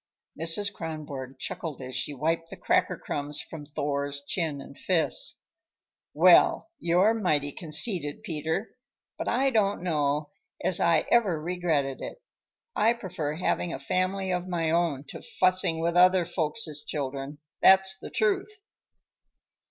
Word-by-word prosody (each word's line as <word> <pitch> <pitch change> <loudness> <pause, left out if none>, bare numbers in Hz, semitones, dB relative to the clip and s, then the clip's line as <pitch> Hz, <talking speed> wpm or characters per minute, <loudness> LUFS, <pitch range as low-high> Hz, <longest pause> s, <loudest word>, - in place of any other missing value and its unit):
Mrs. 165 +6 -1
Kronborg 150 -6 -6
chuckled 160 -5 -4
as 130 -1 -7
she - - 0
wiped 165 +4 -1
the - - -9
cracker - - +1
crumbs 145 0 -3
from 150 -3 -8
Thor's 140 -1 -2
chin 155 -3 -1
and 140 - -11
fists. 185 - 0 0.8
"Well, 330 - +5
you're 180 +6 +3
mighty 155 -10 0
conceited, 155 - -1
Peter! 160 +6 -2 0.5
But - - -3
I 265 +3 +2
don't 205 -5 +1
know 150 -3 0 0.3
as 185 - +4
I 165 -2 +3
ever 205 -9 +3
regretted 155 -5 -1
it. - - -7 0.6
I 225 +2 +4
prefer 180 -9 -4
having 175 0 -1
a - - -3
family 185 +6 -1
of 180 0 -2
my 165 -3 0
own 165 -5 +1
to - - -8
fussing 185 -3 +1
with 170 +1 0
other 180 0 +5
folks' 155 -2 -2
children, 140 0 -4 0.2
that's 190 0 +6
the - - -8
truth." 220 - 0
165 Hz, 135 wpm, -27 LUFS, 145-185 Hz, 0.8 s, that's